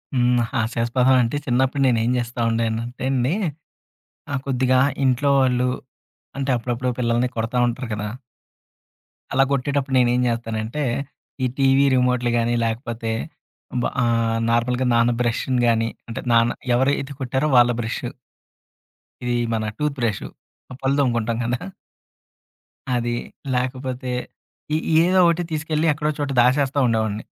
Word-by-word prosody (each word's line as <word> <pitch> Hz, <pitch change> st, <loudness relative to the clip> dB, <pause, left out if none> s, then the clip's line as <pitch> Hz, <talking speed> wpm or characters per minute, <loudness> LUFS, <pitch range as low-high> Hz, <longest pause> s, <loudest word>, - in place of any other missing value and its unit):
హ్మ్. 125 Hz, 0 st, +3 dB
హాస్యాస్పదం 120 Hz, +1 st, +1 dB
అంటే 115 Hz, +5 st, -1 dB
చిన్నప్పుడు 130 Hz, +2 st, +1 dB
నేను 115 Hz, -3 st, +3 dB
ఏం 120 Hz, -, +1 dB
చేస్తా 120 Hz, 0 st, -3 dB
ఉండేనంటే 115 Hz, +2 st, -2 dB
అండి. 130 Hz, +4 st, +1 dB, 1.0 s
ఆ! -, -, -2 dB
కొద్దిగా 130 Hz, -1 st, +2 dB, 0.3 s
ఇంట్లో 130 Hz, +2 st, +2 dB
వాళ్ళు 125 Hz, -1 st, +2 dB, 0.7 s
అంటే 135 Hz, 0 st, -2 dB
అప్పుడప్పుడు 120 Hz, +2 st, -2 dB
పిల్లల్ని 120 Hz, +1 st, +1 dB
కొడతా 115 Hz, +2 st, -2 dB
ఉంటారు 120 Hz, +1 st, -3 dB
కదా! 105 Hz, 0 st, -3 dB, 1.3 s
అలా 135 Hz, -, +5 dB
కొట్టేటప్పుడు 140 Hz, 0 st, 0 dB
నేను 120 Hz, -1 st, +4 dB
ఏం 125 Hz, -, +2 dB
చేస్తానంటే 115 Hz, +4 st, -2 dB, 0.6 s
ఈ -, -, +3 dB
టీవీ 135 Hz, 0 st, +4 dB
రిమోట్‌లు 125 Hz, -1 st, +2 dB
కానీ, 115 Hz, +1 st, +1 dB
లేకపోతే 115 Hz, 0 st, -3 dB, 0.7 s
బ -, -, -2 dB, 0.2 s
ఆహ్, 115 Hz, -1 st, +1 dB
నార్మల్‌గా 125 Hz, +2 st, +1 dB
నాన్న 115 Hz, +1 st, +4 dB
బ్రష్‌ని 125 Hz, +1 st, 0 dB
కానీ 115 Hz, 0 st, +2 dB, 0.2 s
అంటే 115 Hz, -, -4 dB
నాన్న 115 Hz, 0 st, +4 dB, 0.2 s
ఎవరైతే 135 Hz, +2 st, 0 dB
కొట్టారో 130 Hz, +4 st, 0 dB
వాళ్ళ 120 Hz, 0 st, +6 dB
బ్రషు. 120 Hz, +2 st, -3 dB, 1.1 s
ఇది 120 Hz, 0 st, 0 dB, 0.2 s
మన 110 Hz, -1 st, -1 dB
టూత్ 150 Hz, -1 st, -1 dB
బ్రషు. 115 Hz, -4 st, -1 dB, 0.5 s
పళ్ళు 135 Hz, +1 st, +1 dB
తోముకుంటాం 115 Hz, -3 st, +1 dB
కదా! 120 Hz, +1 st, -1 dB, 1.4 s
అది 120 Hz, 0 st, -1 dB, 0.4 s
లేకపోతే 130 Hz, 0 st, -3 dB, 0.6 s
ఏ -, -, +3 dB, 0.3 s
ఏదో 185 Hz, +2 st, +3 dB
ఒకటి 170 Hz, +1 st, +2 dB
తీసుకెళ్ళి, 155 Hz, 0 st, -1 dB
ఎక్కడో 150 Hz, +1 st, -2 dB
చోట 145 Hz, -1 st, -1 dB
దాచేస్తూ 135 Hz, +3 st, +3 dB
ఉండేవాడిని. 110 Hz, -2 st, 0 dB
125 Hz, 125 wpm, -22 LUFS, 115-135 Hz, 1.4 s, వాళ్ళ